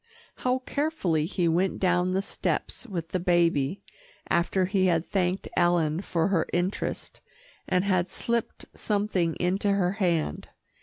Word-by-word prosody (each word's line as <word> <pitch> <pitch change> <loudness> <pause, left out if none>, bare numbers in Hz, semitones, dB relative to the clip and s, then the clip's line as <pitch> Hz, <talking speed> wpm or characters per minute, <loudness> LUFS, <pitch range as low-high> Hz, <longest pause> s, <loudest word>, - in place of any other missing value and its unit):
How 255 0 +1
carefully 195 - 0
he 175 -1 0
went 180 +3 +1
down 180 0 +2
the 190 +1 0
steps 250 - -3
with 170 -6 -4
the 185 - -1
baby, 170 -3 +1 0.5
after 185 +2 +2
he 190 0 +2
had 165 -1 +2
thanked 185 -1 -1
Ellen 175 -2 +2
for 170 -3 0
her 175 -5 +1
interest, 175 +3 -2 0.5
and 185 -1 +2
had 185 -3 +1
slipped 235 +3 -2
something 200 -6 0
into 190 +3 0
her 185 -3 +1
hand. 175 - -1
180 Hz, 140 wpm, -27 LUFS, 170-195 Hz, 0.5 s, down